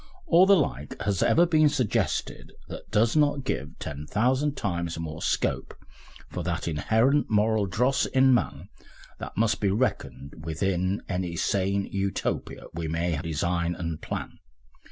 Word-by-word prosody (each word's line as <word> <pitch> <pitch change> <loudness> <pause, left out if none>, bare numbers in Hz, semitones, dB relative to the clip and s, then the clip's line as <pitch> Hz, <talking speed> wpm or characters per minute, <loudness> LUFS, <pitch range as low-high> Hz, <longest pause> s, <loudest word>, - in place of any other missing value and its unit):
] 370 - -27
or 185 +2 +7
the 200 - +7
like 75 - -2
has 100 -3 0
ever 170 - +5
been 155 -3 +4
suggested 130 -7 -1 0.2
that - - -9
does 110 +4 +2
not 145 -2 +2
give 70 - -4
ten 75 +1 -6
thousand 130 - +1
times 85 -6 -2
more 80 -1 -6
scope - - -1 0.5
for 90 - -5
that 85 0 -3
inherent 110 - +2
moral 110 -1 +2
dross 125 +9 +1
in 130 -1 +4
man 120 - -1 0.5
that - - -8
must 110 0 +1
be 100 - +2
reckoned 70 - -2
with 80 +2 -4
in 95 +1 0
any 90 -2 -2
sane 100 +2 0
Utopia 95 0 -3
we 80 0 -4
may 85 +1 -1
design 85 +1 -1
and 85 -3 -4
plan.... - - -5
100 Hz, 155 wpm, -26 LUFS, 85-130 Hz, 0.5 s, or